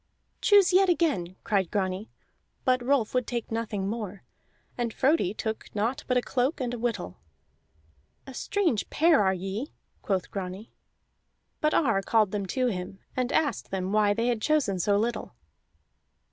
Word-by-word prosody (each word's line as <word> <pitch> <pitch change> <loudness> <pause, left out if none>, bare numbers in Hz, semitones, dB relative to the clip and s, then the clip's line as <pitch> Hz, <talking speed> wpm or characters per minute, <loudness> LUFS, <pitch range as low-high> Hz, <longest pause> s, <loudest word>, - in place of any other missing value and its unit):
"Choose 400 -3 +5
yet 380 +1 +5
again!" 285 - +1
cried 195 -4 +1
Grani. 190 +1 -2 0.6
But 255 -2 +3
Rolf 250 -4 +1
would 250 -2 +1
take 235 -2 -3
nothing 215 -4 -2
more, 205 -3 -5 0.5
and 240 -2 -2
Frodi 265 - +2
took 220 0 -4
naught 225 +5 -1
but 250 - +2
a 245 - +1
cloak 265 +5 0
and 245 -2 -2
a 245 - -4
whittle. 225 - -3 1.1
"A 265 - -9
strange 335 - 0
pair 325 -6 +4
are 190 -1 +2
ye," 195 - -5 0.3
quoth 190 -3 -1
Grani. 195 +2 -6 0.9
But 305 0 +2
Ar 225 -10 +3
called 215 -1 +2
them 200 -2 -2
to 255 +6 0
him 190 -4 -3 0.2
and 255 -1 0
asked 300 -3 0
them 190 0 -2
why 210 -1 +3
they 230 - 0
had 240 -3 0
chosen 275 -10 +1
so 200 +3 +2
little. 225 - -2
225 Hz, 160 wpm, -27 LUFS, 195-255 Hz, 1.1 s, Choose